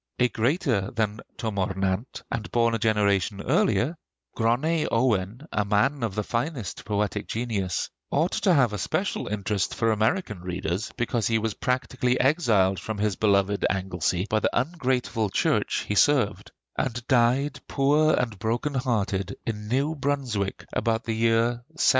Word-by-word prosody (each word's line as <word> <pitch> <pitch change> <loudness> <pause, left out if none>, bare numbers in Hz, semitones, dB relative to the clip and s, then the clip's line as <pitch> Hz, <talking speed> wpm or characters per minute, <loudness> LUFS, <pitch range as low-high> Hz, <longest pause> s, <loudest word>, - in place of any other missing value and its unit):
A 125 0 +3
greater 120 - 0
than 110 -2 -1 0.2
Twm 110 -3 -3
O'r 95 0 -1
Nant, 95 +5 -2
and 110 -1 -3
born 115 -1 +2
a 115 - 0
generation 105 -2 +1
earlier, 115 - +1 0.4
Gronney 135 +8 +1
Owen, 115 +1 0
a 105 - +1
man 105 +7 +1
of 110 -5 -2
the 105 - -1
finest 120 - -3
poetic 105 -1 -1
genius, 105 -6 -2 0.2
ought 160 +5 +1
to 195 - +2
have 130 -9 +4
a 105 - -3
special - - -1
interest 100 -1 -1
for 115 -1 +2
American 110 - 0
readers 90 +2 -3
because 120 -2 0
he 115 - +2
was 110 -1 -1
practically 125 0 0
exiled 115 - +3
from 110 +3 -5
his 105 -1 0
beloved 100 -1 +2
Anglesea 90 -1 -1
by 110 - +1
the - - +1
ungrateful 130 - -1
church - - 0
he - - 0
served; 120 -3 +2 0.2
and 120 -2 -2
died, 130 +3 +2
poor 150 +3 +3
and 115 -5 -2
broken 120 +6 -1
hearted, 105 -7 -1
in 105 -2 -4
New 135 +7 +1
Brunswick 135 -9 -2
about 115 0 0
the 115 - -2
year 115 +1 +2
1780. - - -15
115 Hz, 155 wpm, -26 LUFS, 100-130 Hz, 0.4 s, have